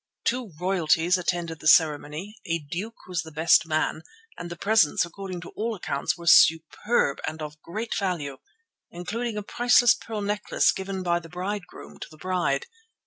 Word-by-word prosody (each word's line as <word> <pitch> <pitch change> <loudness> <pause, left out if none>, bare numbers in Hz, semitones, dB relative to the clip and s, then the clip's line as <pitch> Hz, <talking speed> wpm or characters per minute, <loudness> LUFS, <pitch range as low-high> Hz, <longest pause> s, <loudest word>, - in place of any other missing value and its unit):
Two 245 -4 -1
Royalties 180 -1 +2
attended 170 -2 -2
the - - -4
ceremony, 155 +5 +3
a 165 0 +1
duke 175 +9 -7
was 180 -2 -2
the 160 - -11
best 160 +2 +4
man, 155 0 0 0.3
and 175 - -7
the 175 - -6
presents 200 -4 +3
according 185 0 -7
to 165 - -9
all 225 +1 -3
accounts 160 -4 -2
were 170 - -10
superb 160 +2 +4
and 160 - -4
of 150 0 -8
great 215 +7 -5
value, 165 -10 -2 0.5
including 215 +6 -4
a 210 - -3
priceless 240 +2 +4
pearl 220 -2 -6
necklace 205 +1 +1
given 190 -1 -5
by 175 -1 +1
the 165 -1 -13
bridegroom 180 - -6
to - - -7
the 155 - -16
bride. 175 -5 -1
175 Hz, 165 wpm, -25 LUFS, 160-205 Hz, 0.5 s, best